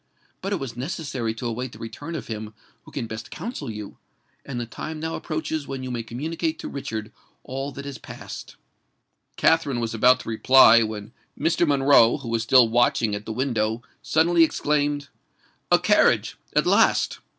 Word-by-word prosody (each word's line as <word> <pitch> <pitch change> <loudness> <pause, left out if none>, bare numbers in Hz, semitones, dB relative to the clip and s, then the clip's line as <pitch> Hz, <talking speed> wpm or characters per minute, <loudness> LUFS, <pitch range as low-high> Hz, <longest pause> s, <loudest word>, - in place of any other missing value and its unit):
"But 195 - -4
it - - +2
was 135 -5 -6
necessary 130 -5 -3
to 115 - -7
await 120 +2 -3
the - - -11
return 145 +8 -7
of 155 - -5
him 110 -1 -6 0.3
who - - -14
can - - -3
best 110 0 -7
counsel 225 - -6
you; 105 -2 -8 0.4
and 130 -3 -5
the 120 - -3
time 155 +7 -7
now 160 +1 -3
approaches 155 -2 -3
when 135 -1 -5
you 130 - -5
may 120 -1 -2
communicate 160 +8 -3
to - - -7
Richard 110 -6 -5 0.3
all 135 +2 -5
that 140 +2 -8
has 140 -1 -7
passed." - - -9 0.8
Katherine 145 -6 +2
was 115 -1 -2
about 125 +3 +4
to - - -8
reply, 115 0 +7
when 110 0 -4 0.3
Mr. 165 +2 +2
Monroe, 135 -4 +5
who 135 -5 -8
was 115 -1 0
still 120 +1 +6
watching 115 -2 +2
at 105 +1 -5
the - - -3
window, 115 -2 -1 0.2
suddenly 165 +2 +3
exclaimed, 145 -2 0 0.6
"A - - +7
carriage—at - - +2
last!" - - +3
130 Hz, 175 wpm, -24 LUFS, 115-150 Hz, 0.8 s, reply